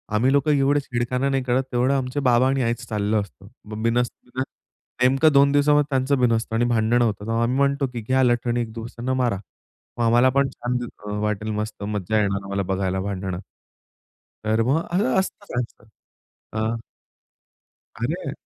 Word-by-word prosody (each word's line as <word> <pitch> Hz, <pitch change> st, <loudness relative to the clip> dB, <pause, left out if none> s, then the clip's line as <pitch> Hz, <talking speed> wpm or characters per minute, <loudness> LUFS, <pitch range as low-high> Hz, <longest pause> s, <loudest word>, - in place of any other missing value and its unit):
आम्ही 125 Hz, +5 st, +3 dB
लोकं 140 Hz, +2 st, +3 dB
एवढे 140 Hz, 0 st, +3 dB
छेडखाना 125 Hz, +1 st, -1 dB
नाही 135 Hz, -1 st, 0 dB
करत, 125 Hz, +1 st, +1 dB
तेवढं 125 Hz, +3 st, +2 dB
आमचे 130 Hz, +2 st, -2 dB
बाबा 125 Hz, -1 st, +4 dB
आणि 135 Hz, 0 st, +1 dB
आईच 120 Hz, +2 st, -2 dB
चाललं 105 Hz, 0 st, 0 dB
असतं. 100 Hz, -1 st, -12 dB, 0.2 s
मग 105 Hz, +1 st, -6 dB
बिनसतं 120 Hz, +1 st, -1 dB
ना, -, -, +2 dB, 0.6 s
नेमकं 135 Hz, +5 st, +5 dB
2 140 Hz, 0 st, +6 dB
दिवसामध्ये 145 Hz, 0 st, +4 dB
त्यांचं 135 Hz, 0 st, +1 dB
बिनसतं 115 Hz, -2 st, +1 dB
आणि 120 Hz, +1 st, +2 dB
भांडणं 120 Hz, +1 st, +2 dB
होतं. 105 Hz, 0 st, -3 dB
आम्ही 125 Hz, +3 st, +1 dB
म्हणतो 140 Hz, 0 st, +2 dB
की, 120 Hz, -, -4 dB
"घ्या 130 Hz, 0 st, +3 dB
लठणी 120 Hz, 0 st, +1 dB
एक 110 Hz, -1 st, -4 dB
दुसऱ्यांना 120 Hz, +2 st, -4 dB
मारा, 125 Hz, -6 st, +1 dB, 0.6 s
मग 120 Hz, -, 0 dB
आम्हाला 120 Hz, +3 st, +5 dB
पण 140 Hz, +1 st, +2 dB
छान 125 Hz, 0 st, -3 dB
दिस 120 Hz, -, -5 dB, 0.2 s
अ, -, -, -5 dB
वाटेल 105 Hz, 0 st, -1 dB
मस्त 105 Hz, -1 st, -4 dB
मज्जा 105 Hz, +1 st, -1 dB
येणार 100 Hz, -1 st, -1 dB
आम्हाला 100 Hz, 0 st, -2 dB
बघायला 95 Hz, 0 st, -1 dB
भांडणं." 95 Hz, -2 st, -3 dB, 1.1 s
तर 110 Hz, +1 st, +2 dB
मग 135 Hz, +7 st, +2 dB
अ, 195 Hz, +4 st, +1 dB
असतंच 195 Hz, +1 st, -3 dB
असतंच. 115 Hz, -2 st, -8 dB, 0.6 s
अ 110 Hz, -, -2 dB, 1.4 s
अरे. 140 Hz, +2 st, -2 dB
120 Hz, 170 wpm, -23 LUFS, 110-135 Hz, 1.4 s, 2